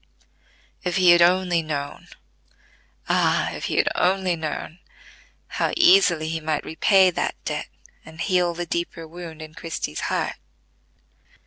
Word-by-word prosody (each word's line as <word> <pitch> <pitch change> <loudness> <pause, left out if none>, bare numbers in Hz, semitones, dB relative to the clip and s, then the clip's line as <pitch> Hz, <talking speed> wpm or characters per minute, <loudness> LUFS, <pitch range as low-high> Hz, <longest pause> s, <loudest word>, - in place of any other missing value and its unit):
If 180 -1 -2
he 180 -2 +6
had 175 0 +6
only 180 -1 +3
known—ah, 140 - -4
if - - -6
he - - -2
had - - +2
only 185 0 +1
known!—how 160 +2 -7
easily 345 - +5
he 160 0 -2
might 155 -1 -2
repay 190 +3 +4
that - - -2
debt, - - -3 0.4
and 160 +1 -14
heal 175 0 +1
the 175 +1 -4
deeper 170 -1 -4
wound 165 -1 -9
in 155 0 -11
Christie's 160 - -5
heart. - - -2
170 Hz, 125 wpm, -23 LUFS, 160-180 Hz, 0.4 s, he